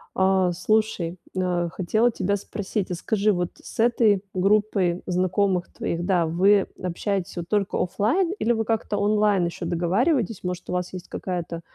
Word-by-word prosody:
А, 190 -1 +3
слушай, 185 -2 0 0.2
э, 180 -2 0
хотела 215 +7 +2
тебя 200 -3 -1
спросить, 200 -1 -4
а - - -1
скажи, 210 +4 +1
вот 175 -2 -1
с - - -11
этой 225 -4 +3
группой 195 -2 +2
знакомых 185 0 0
твоих, 170 +1 -3
да, 175 -3 +2
вы 190 +5 +4 0.2
общаетесь 185 +1 -2
вот 175 0 -5
только 205 -2 0
оффлайн 245 - +1
или 240 - +2
вы 225 -1 0
как-то 220 -1 -1
онлайн 205 -2 +2
ещё 170 0 -5
договариваетесь, 200 - +1
может, 180 0 -4
у - - -3
вас 180 0 -2
есть 185 -1 -8
какая-то 175 -2 -4
190 Hz, 160 wpm, -24 LUFS, 180-210 Hz, 0.2 s, вы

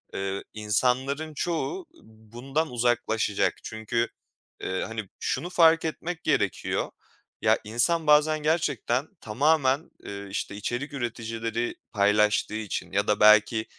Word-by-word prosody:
ııı, 95 0 -3
insanların 130 +8 0
çoğu, 170 - -2 0.2
ııı, - - -21
bundan 120 +8 -4
uzaklaşacak. 120 -3 +1
Çünkü, 115 +2 -2 0.6
ııı, 95 0 -2
hani, 110 -3 -6
şunu 175 - -2
fark 165 -2 +5
etmek 170 +2 -4
gerekiyor: 120 - 0 0.5
Ya, - - +3
insan 125 +10 0
bazen 150 +1 +5
gerçekten 145 -4 0
tamamen, 140 +5 +1
ııı, 100 0 -7
işte, 100 0 -4
içerik 125 +8 -4
üreticileri 115 -2 -3 0.2
paylaştığı 105 +1 +2
için 110 -3 -4
ya 100 +1 0
da 105 - +2
belki 110 +1 +5
120 Hz, 115 wpm, -26 LUFS, 105-150 Hz, 0.6 s, fark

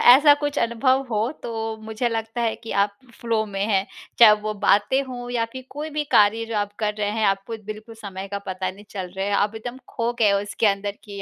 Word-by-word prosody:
ऐसा 290 +2 +7
कुछ 290 0 -2
अनुभव 255 +3 +2
हो 220 +2 0
तो 225 -1 -3
मुझे 220 +2 -1
लगता 225 +1 -3
है 225 -2 +1
कि 230 - -9
आप 200 0 -5 0.2
फ़्लो 225 -2 +1
में 195 -2 -3
हैं। 195 -3 +2 0.3
चाहे 230 -3 +10
वो 215 0 -2
बातें 210 +5 +3
हों 245 -2 -7
या 235 -2 +1
फिर 260 -1 -8
कोई 300 +3 -5
भी 300 0 -1
कार्य 215 +2 +4
जो 225 0 -5
आप 205 0 -2
कर 210 -1 0
रहे 205 -1 +1
हैं, 220 0 0
आपको 195 +3 0
बिल्कुल 215 +2 -8
समय 195 -3 -7
का 200 - -2
पता 185 0 -2
नहीं 200 +2 -15
चल 190 -3 -5
रहे 190 0 -1
है। 205 - 0
आप 205 +2 +1
एकदम 240 +3 -6
खो 235 0 -1
गए 215 -3 +5
हो 200 - +3
इसके 205 +2 0
अंदर 200 0 -1
कि 200 -2 -8
220 Hz, 235 wpm, -23 LUFS, 205-235 Hz, 0.3 s, चाहे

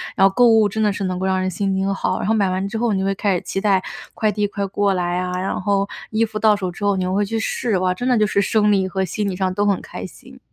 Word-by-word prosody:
然 195 -1 +5
后 195 - -2
购 245 +3 +5
物 220 -2 +5
真 220 +2 -3
的 210 - +3
是 205 - -4
能 185 -1 -2
够 190 - -2
让 190 0 +1
人 185 - 0
心 195 +2 -1
情 195 +1 0
好。 185 -1 -1
然 - - -3
后 220 - +3
买 200 -4 +2
完 185 +1 -1
之 220 - -4
后 230 -2 +1
你 190 - 0
就 190 - -1
会 195 - +1
开 200 -1 0
始 175 - -2
期 - - -3
待， 195 -3 +3 0.3
快 215 -2 +1
递 205 0 0
快 200 0 -3
过 200 0 +1
来 175 -1 -1
啊， 180 0 -3
然 190 - -2
后 200 0 +1 0.2
衣 220 +1 +2
服 215 -1 -6
到 215 -1 +4
手 185 -3 -3
之 175 - -9
后 200 -1 +2
你 185 - -1
又 185 0 -1
会 205 +1 +1
去 225 +3 -2
试， 225 -1 -1
哇， 185 0 +1
真 245 +7 -4
的 245 - +3
就 215 - +3
是 200 - +1
生 210 0 +2
理 190 -2 +2
和 190 0 -1
心 205 +3 -2
理 185 - -3
上 185 0 -1
都 205 +2 0
很 200 -2 +1
开 - - -8
心。 - - -14
195 Hz, 350 characters per minute, -20 LUFS, 185-210 Hz, 0.3 s, 然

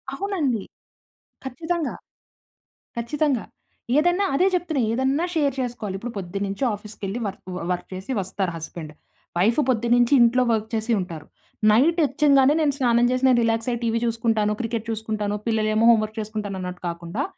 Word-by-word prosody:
అవునండి. 300 - -1 0.8
ఖచ్చితంగా. 320 +4 -3 1.0
ఖచ్చితంగా. 275 +1 0 0.5
ఏదన్నా 350 +5 +3
అదే 365 +7 +4
చెప్తున్నా. 340 -6 0
ఏదన్నా 265 +7 +1
షేర్ 285 -4 +2
చేసుకోవాలి. 235 -6 -4
ఇప్పుడు 235 +4 -6
పొద్దున్న 195 +1 -3
నుంచి 200 +7 -4
ఆఫీస్‌కి 210 +1 -12
వెళ్లి 195 +5 -3
వర్క్ 195 - -8 0.3
వర్క్ 180 - -3
చేసి 190 +7 -6
వస్తారు 190 -1 -3
హస్బాండ్. 160 -1 -8 0.4
వైఫ్ 220 +9 +3
పొద్దున్న 240 -1 +2
నుంచి 240 +3 +3
ఇంట్లో 240 +2 +4
వర్క్ 220 0 -1
చేసి 225 +1 -1
ఉంటారు. 170 -5 -6 0.4
నైట్ 305 +11 +4
వచ్చిగానే 280 -1 +4
నేను 295 -2 +2
స్నానం 240 -3 +3
చేసి 255 0 -1
నేను 250 -2 +5
రిలాక్స్ 225 +1 0
అయ్యి 240 -1 -1
టీవీ 230 0 +1
చూసుకుంటాను. 225 -2 +1
క్రికెట్ 230 -2 -3
చూసుకుంటాను. 215 -2 -2
పిల్లలు 220 -1 +1
ఏమో 220 +1 +3
హోమ్ 230 -2 +6
వర్క్ 215 +1 -7
చేసుకుంటాను. 210 -2 -4
అన్నట్టు 180 0 -6
కాకుండా 170 +9 -4
230 Hz, 155 wpm, -23 LUFS, 210-270 Hz, 1.0 s, హోమ్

